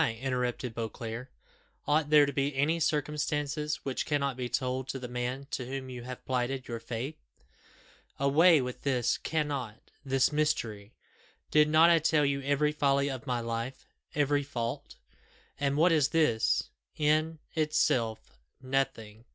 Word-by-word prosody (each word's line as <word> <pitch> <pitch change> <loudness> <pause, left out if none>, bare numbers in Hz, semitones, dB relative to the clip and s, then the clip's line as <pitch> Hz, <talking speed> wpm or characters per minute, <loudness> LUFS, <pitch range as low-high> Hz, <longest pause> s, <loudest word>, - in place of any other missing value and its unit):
interrupted 125 -2 -2
Beauclerc. 115 +2 -5 0.6
"Ought 150 0 +2
there 150 -1 +7
to 140 - -3
be 140 +1 0
any 155 +5 +2
circumstances 150 -1 -1
which 135 -2 -2
cannot 140 -3 0
be 125 -1 -4
told 130 +1 -1
to - - -3
the 125 -1 -6
man 125 +2 -3
to 125 - -3
whom 130 0 -5
you 125 -1 -7
have 125 +1 -8
plighted 130 +1 -1
your 115 -1 -4
faith? 120 +6 -5 1.0
Away 150 +3 +5
with 125 -1 -5
this 125 -4 +1
'cannot 140 -8 -3
this 135 0 +2
mystery!' 120 -9 -1 0.6
Did 150 0 +5
not 160 +2 +6
I 165 - +5
tell 155 -1 +3
you 140 0 0
every 145 +2 +1
folly 140 -1 +1
of 130 -3 -7
my 125 -2 0
life 115 +3 -4 0.3
every 145 0 +2
fault? 120 -4 -4 0.6
And 140 0 0
what 170 +3 +5
is 150 -4 +4
this? 150 -8 +2 0.3
in 155 +1 +2 0.2
itself, 125 - 0 0.2
nothing! 120 -4 -2
135 Hz, 145 wpm, -30 LUFS, 125-150 Hz, 1.0 s, there